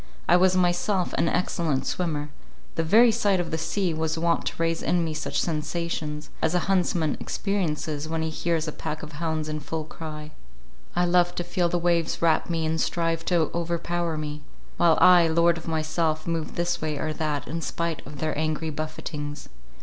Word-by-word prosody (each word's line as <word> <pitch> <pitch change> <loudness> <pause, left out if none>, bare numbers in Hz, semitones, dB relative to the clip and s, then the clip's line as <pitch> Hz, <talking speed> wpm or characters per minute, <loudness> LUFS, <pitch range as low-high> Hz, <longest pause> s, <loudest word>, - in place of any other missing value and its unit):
I 175 - +6
was 185 +1 +4
myself 180 +1 +1
an 165 - +2
excellent 155 -6 0
swimmer—the 145 - -4
very 225 +8 +6
sight 205 -4 +2
of 175 - -2
the 160 - 0
sea 170 +2 0
was 160 0 -1
wont 170 +1 +1
to - - -2
raise 165 0 0
in 175 -2 +1
me 160 - -2
such 155 - -2
sensations, 155 -1 -2
as 160 +2 +1
a 180 - +3
huntsman 175 -5 +1
experiences, 155 -6 -2
when 160 0 -1
he 160 - -2
hears 165 0 -1
a - - -1
pack 155 +1 -5
of 155 - -7
hounds 160 0 -2
in 155 0 -3
full 155 +2 -4
cry; 155 -1 -8 0.6
I 175 0 +3
loved 175 0 +3
to 175 - -2
feel 175 0 0
the 175 - +1
waves 170 -1 +1
wrap 165 0 +2
me 165 -2 0
and 160 +1 0
strive 165 -1 0
to 170 -4 +2
overpower 170 -1 -1
me; 150 0 -4 0.4
while 165 -2 +5
I, 175 -2 +7
lord 170 +1 +3
of 160 - -12
myself, 155 0 0
moved 165 -2 -2
this 175 0 0
way 155 -1 -2
or 155 +2 -2
that, 150 -2 -2
in 165 +2 -3
spite 170 -1 -2
of 145 - -9
their 155 +2 -1
angry 155 +1 -1
buffetings. 150 -1 -5
165 Hz, 190 wpm, -26 LUFS, 155-175 Hz, 0.6 s, I